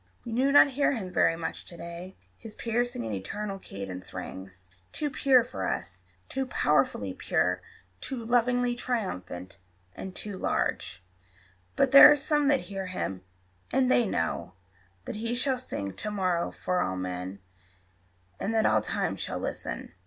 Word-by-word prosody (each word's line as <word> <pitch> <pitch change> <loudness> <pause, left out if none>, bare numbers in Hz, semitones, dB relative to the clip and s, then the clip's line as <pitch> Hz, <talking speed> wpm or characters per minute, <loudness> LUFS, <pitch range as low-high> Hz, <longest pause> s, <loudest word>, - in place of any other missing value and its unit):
We 235 - -5
do 260 +4 +2
not 290 0 +8
hear 280 +2 +2
him 190 -7 -5
very 165 - +4
much 165 0 -5
to 170 - -11
day: 170 +2 -8 0.2
His 225 -2 -8
piercing 235 - -1
and 110 - -3
eternal 195 - -4
cadence 95 - -7
rings 95 -1 -7 0.2
Too 295 -2 -2
pure 260 -2 +5
for 245 - -4
us - - -3 0.2
too 265 0 -2
powerfully - - +1
pure, - - 0 0.4
Too 250 -4 -5
lovingly 245 +1 +2
triumphant, 100 - -4 0.4
and 190 -1 -7
too 205 -3 -5
large; 95 - -1 0.7
But 270 - +3
there 275 - +11
are - - +6
some 295 0 +2
that 280 -2 +4
hear 195 -2 -5
him, 95 - -3 0.5
and 255 0 +3
they 240 -3 +4
know 85 - -2 0.5
That - - -5
he 230 +2 -2
shall 260 +1 +1
sing 100 - -4
to 215 - -4
morrow 185 -4 0
for 180 0 -1
all 95 - -1
men, 90 +1 -4 1.0
And 225 +3 -1
that 220 - +3
all - - +4
time - - -1
shall - - -3
listen. - - -4
210 Hz, 160 wpm, -28 LUFS, -, 1.0 s, there